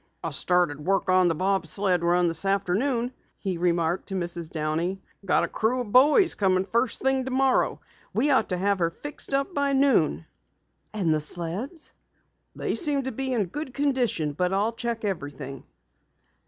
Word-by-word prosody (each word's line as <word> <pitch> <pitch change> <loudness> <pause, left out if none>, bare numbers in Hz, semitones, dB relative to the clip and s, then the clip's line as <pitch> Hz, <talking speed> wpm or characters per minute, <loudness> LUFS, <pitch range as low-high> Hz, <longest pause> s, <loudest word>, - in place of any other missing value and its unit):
"I - - -2
started 175 -5 +1
work 195 +1 0
on 185 -1 +5
the 165 - +1
bob 190 0 0
sled 180 0 +1
run 175 +1 +3
this 165 0 -2
afternoon," 215 +6 0 0.2
he 185 -4 -3
remarked 170 0 0
to 195 - -4
Mrs. 175 -2 -2
Downey. 165 +4 -2 0.3
"Got 180 - +3
a - - 0
crew 235 +4 0
of 220 -4 -7
boys 295 - +5
coming 190 -2 +1
first 235 +5 -1
thing 265 0 +2
tomorrow. 265 0 +1 0.3
We 290 - +2
ought 260 -5 +3
to 180 - -1
have 200 +1 +1
her 170 -1 +2
fixed 290 - -9
up 275 +6 0
by 280 -2 +1
noon." 240 - +2 0.7
"And 185 -7 +1
the 155 - 0
sleds?" 185 - -2 0.6
"They - - -2
seem 295 -6 0
to 265 - -3
be 265 +2 -3
in 225 -5 +1
good 265 - -6
condition, 250 - 0
but 180 +4 0
I'll 205 +4 +1
check 230 -1 -3
everything." 145 -7 -5
195 Hz, 170 wpm, -26 LUFS, 175-260 Hz, 0.7 s, on